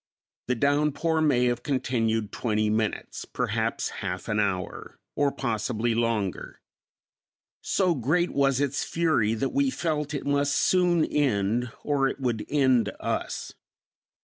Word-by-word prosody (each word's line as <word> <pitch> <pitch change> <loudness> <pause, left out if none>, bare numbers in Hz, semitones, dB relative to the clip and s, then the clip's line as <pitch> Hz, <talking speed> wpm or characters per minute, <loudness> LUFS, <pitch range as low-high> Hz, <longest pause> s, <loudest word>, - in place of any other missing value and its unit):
The 125 - +1
downpour 150 +4 +1
may 130 -5 +3
have 120 -1 0
continued 115 -5 0
twenty 110 -2 0
minutes, 110 0 -2
perhaps - - -2
half 90 -1 -4
an 105 0 +1
hour, 95 -3 -2 0.2
or 145 -1 +2
possibly 115 -2 -1
longer. 115 -5 -2 1.0
So 185 -3 +1
great 160 +6 +1
was 135 -2 +2
its 140 -1 0
fury 155 -10 +1
that 125 +5 -1
we 280 0 +2
felt 150 - -2
it 140 - -4
must 140 0 +1
soon 175 0 +3
end 120 -3 0
or 140 -2 +2
it 135 - -4
would 120 -5 -2
end 130 -6 +3
us. - - -3
130 Hz, 130 wpm, -26 LUFS, 110-145 Hz, 1.0 s, may